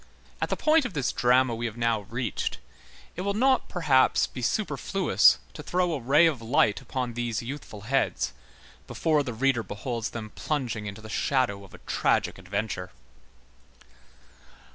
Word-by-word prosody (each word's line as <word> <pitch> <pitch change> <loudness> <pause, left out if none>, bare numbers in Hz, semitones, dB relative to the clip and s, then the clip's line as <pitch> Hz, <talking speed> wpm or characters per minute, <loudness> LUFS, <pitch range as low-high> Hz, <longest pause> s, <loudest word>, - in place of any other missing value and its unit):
At - - 0
the - - -1
point 310 0 +4
of 245 -6 -4
this 135 -4 0
drama 125 0 +3
which 115 - -5
we 120 - -2
have 110 0 -8
now 115 -2 +1
reached, 120 -1 -2 0.6
it 180 - -4
will 200 +1 -1
not 260 +4 +2
perhaps 140 -7 +3
be 125 - -8
superfluous 190 - +3 0.2
to - - -8
throw 180 -1 0
a 150 - -2
ray 140 +7 +5
of 150 -8 +1
light 115 -3 +2
upon 125 -3 -3
these 120 -1 -2
youthful 120 -5 -7
heads, 135 +6 0 0.5
before 155 -2 +1
the 135 -3 -4
reader 125 +1 +1
beholds 115 +2 -4
them 110 -2 -7
plunging 120 -8 -3
into 100 +2 -7
the 110 - -10
shadow 115 -4 0
of 95 - -14
a - - -18
tragic - - +1
adventure. 100 -3 -3
125 Hz, 165 wpm, -27 LUFS, 110-150 Hz, 0.6 s, ray